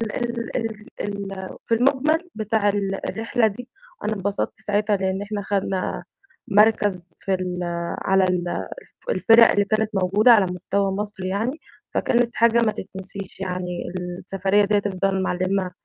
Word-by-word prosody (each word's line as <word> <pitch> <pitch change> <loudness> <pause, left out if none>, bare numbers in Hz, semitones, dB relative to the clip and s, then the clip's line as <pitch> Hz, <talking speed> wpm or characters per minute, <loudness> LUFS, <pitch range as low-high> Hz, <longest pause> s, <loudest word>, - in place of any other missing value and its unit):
ال 235 0 -3
ال 220 -2 -4 0.2
ال 195 -2 -5
في - - +1
المجمل 285 +8 +2
بتاع 215 -1 +1
ال 195 -1 -2
الرحلة 225 +1 +1
دي، 240 +5 -7 0.3
أنا 215 +1 0
انبسطت 200 +2 -3
ساعتها 210 0 +1
لأن 190 0 -1
إحنا 205 0 -3
خدنا 195 -1 -1 0.4
مركز 205 -5 +3
في 195 - -1
ال 180 -1 -2 0.4
على 190 0 +3
ال 180 -1 -1 0.4
الفِرَق 230 - +6
اللي 205 - +3
كانت 215 +1 0
موجودة 195 +5 +4
على 210 -4 +5
مستوى 195 +2 -1
مصر 205 -1 -4
يعني. 220 - -2 0.3
فكانت 240 -1 +2
حاجة 235 0 +4
ما 215 - +2
تتنسيش 190 0 -8
يعني 180 -1 -3 0.4
السفرية 195 +2 +2
دي 205 +1 +2
هتفضل 195 -1 0
معلمة 185 0 0
200 Hz, 140 wpm, -23 LUFS, 190-220 Hz, 0.4 s, الفِرَق